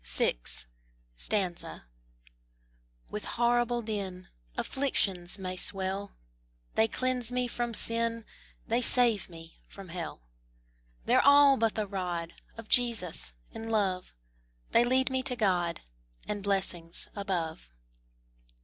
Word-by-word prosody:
VI. - - +3 2.8
With 210 - -4
horrible 240 0 +1
din 195 -4 -4 0.3
Afflictions 195 -10 0
may 185 -1 -4
swell, 195 +2 -1 0.6
They 220 - +4
cleanse 250 0 0
me 250 0 0
from 240 -1 -3
sin, 230 0 0 0.4
They 235 +2 +1
save 235 -6 +5
me 165 -1 -12
from 195 -2 -11
hell: 165 - -6 0.8
They're - - +5
all 285 -1 +7
but 225 -3 +1
the 215 - 0
rod 180 -4 -3 0.2
Of 225 -1 -9
Jesus, 185 - +2 0.2
in 225 0 -6
love; 195 - 0 0.6
They 235 - +6
lead 260 +2 +2
me 260 0 +1
to 260 -1 -2
God 180 -7 +1 0.5
And 205 -1 -2
blessings 190 -4 -1
above. 175 - -3
210 Hz, 110 wpm, -30 LUFS, 185-240 Hz, 2.8 s, all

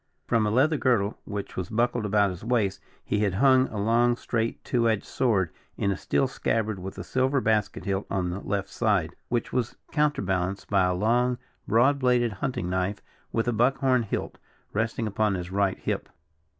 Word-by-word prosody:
From 115 -3 +2
a - - +1
leather 140 +8 +3
girdle, 115 -7 +1
which 100 -1 -5
was 95 -1 -3
buckled 120 0 0
about 100 -1 +3
his 90 +1 -9
waist, 115 -5 0 0.2
he 105 - 0
had 100 -3 +1
hung 130 +3 +5
a 110 - -7
long, 120 +3 +3
straight, 115 -1 -2
two 115 -2 +2
edged 110 -2 0
sword 100 - +1 0.3
in 100 - +1
a - - 0
steel 135 - +1
scabbard 110 -5 -1
with 95 +1 -7
a 90 - -5
silver 130 +7 +1
basket 110 -4 0
hilt 100 0 -1
on 90 -2 -1
the 90 - -4
left 100 -1 -2
side, 100 -6 0
which 120 -2 -1
was 125 -2 -1 0.2
counterbalanced 95 -12 0
by 100 -2 +4
a 90 0 +1
long, 120 +5 +2 0.3
broad 130 +5 +4
bladed 125 -2 +2
hunting 95 -3 -3
knife 95 +3 -1 0.3
with 115 +1 0
a 120 - +2
buck 125 +5 +3
horn 130 -2 +3
hilt, 110 - -4 0.3
resting 115 +2 -1
upon 105 -1 +1
his 90 0 -5
right 100 0 +1
hip. - - -3
110 Hz, 190 wpm, -26 LUFS, 95-120 Hz, 0.3 s, hung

